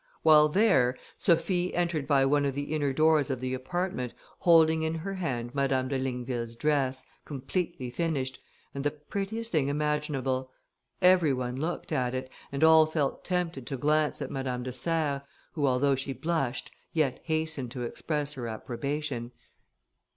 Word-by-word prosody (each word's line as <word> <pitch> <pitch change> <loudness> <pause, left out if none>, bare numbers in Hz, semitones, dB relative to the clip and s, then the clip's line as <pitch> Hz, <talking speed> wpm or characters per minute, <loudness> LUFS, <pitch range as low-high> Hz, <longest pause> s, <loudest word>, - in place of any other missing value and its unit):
While 150 -1 +7
there, 150 - +3 0.2
Sophie 175 +1 +1
entered 170 -5 0
by 140 -2 +4
one 145 +1 +3
of 140 -2 -1
the 145 +2 -3
inner 145 -3 +1
doors 155 +1 +3
of 130 -2 -1
the 130 0 -3
apartment, 130 -1 -3 0.2
holding 160 -2 +5
in 160 +1 -1
her 185 +5 -4
hand 125 -10 -3
Madame 135 -2 +1
de 135 -1 0
Ligneville's 125 -2 -3
dress, 135 -1 0 0.2
completely 140 -1 -3
finished, 135 -2 -2 0.3
and 140 - -4
the 145 - +3
prettiest 200 +10 -4
thing 150 -5 +2
imaginable: 145 -3 -1 0.5
every 180 -5 +6
one 125 -1 -2
looked 160 +6 -3
at 125 0 0
it, 130 0 -4 0.2
and 140 +2 -1
all 160 -1 +7
felt 155 -3 -1
tempted 175 -8 -2
to 135 - -3
glance 150 +2 +1
at 135 - -6
Madame 130 -2 -3
de 125 0 -4
Serres, 145 +1 0 0.3
who, 145 -4 0
although 135 +2 +3
she 135 +1 -2
blushed, 135 -2 -2 0.2
yet 155 -6 +1
hastened 155 -5 -1
to 125 0 -5
express 150 +4 -2
her 125 -4 -5
approbation. 125 +2 -3
145 Hz, 160 wpm, -29 LUFS, 130-160 Hz, 0.5 s, While